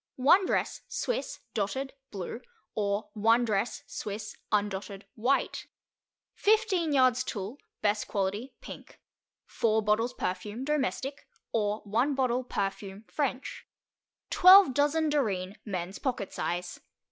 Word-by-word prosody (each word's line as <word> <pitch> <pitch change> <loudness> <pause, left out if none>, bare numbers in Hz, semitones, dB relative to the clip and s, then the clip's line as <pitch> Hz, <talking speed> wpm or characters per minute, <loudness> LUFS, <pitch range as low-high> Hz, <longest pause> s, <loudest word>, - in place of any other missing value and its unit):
1 355 +9 +5
Dress, - - 0
Swiss, - - -3
Dotted, 265 +7 -2 0.2
blue, 200 +4 -6 0.3
or 205 0 -1
1 230 +3 +3
Dress, 220 +1 -1
Swiss, 215 +1 -6 0.2
undotted, 200 -1 -1
white. 250 +5 0 0.7
15 410 -6 +2
yards 255 -2 +4
Tulle, 215 +3 -5 0.2
best 210 0 +1
quality, 205 +6 -2
pink. - - -11 0.5
4 220 -1 +1
bottles 220 +4 +1
perfume, 210 +6 -3
domestic, 280 -1 -2 0.2
or 210 -1 0
1 240 +8 +1
bottle, 255 -1 +1
perfume, 195 -2 -4
French. 275 -3 -3 0.6
12 370 -5 +8
Dozen 295 +3 +2
Dorine, 205 -9 -1
men's 185 -2 -4
pocket 245 -7 -2
size. 175 +1 -3
225 Hz, 110 wpm, -29 LUFS, 205-270 Hz, 0.7 s, 12